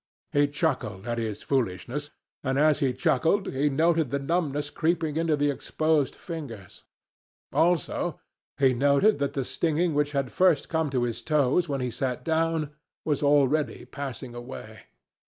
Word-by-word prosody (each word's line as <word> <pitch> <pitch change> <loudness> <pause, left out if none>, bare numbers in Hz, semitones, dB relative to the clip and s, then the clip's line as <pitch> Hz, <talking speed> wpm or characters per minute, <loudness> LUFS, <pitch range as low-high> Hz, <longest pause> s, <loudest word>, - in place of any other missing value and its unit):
He 145 0 +3
chuckled 145 - -2
at 120 0 -1
his 110 -3 -4
foolishness, 130 +3 -2 0.3
and 135 -1 0
as 150 0 +4
he 135 -4 +2
chuckled 165 +7 +1
he 140 +3 +2
noted 160 0 +2
the 140 - 0
numbness 145 -1 -1
creeping 160 -2 0
into 165 -1 +2
the 145 0 +1
exposed 155 0 0
fingers. 135 - -8 0.7
Also, 175 0 +1 0.4
he 135 -2 +4
noted 140 - +3
that 140 -1 -1
the 135 -2 -2
stinging 165 +3 0
which 145 0 0
had 135 -3 -1
first 180 -6 +3
come 160 -2 0
to 130 -3 0
his 120 -2 -2
toes 150 +2 +2
when 140 -2 -1
he 125 -1 -2
sat 125 0 -3
down 160 -2 0 0.3
was 150 -3 0
already 145 +1 +2
passing 135 -3 -6
away. 120 -3 -9
145 Hz, 155 wpm, -27 LUFS, 130-160 Hz, 0.7 s, as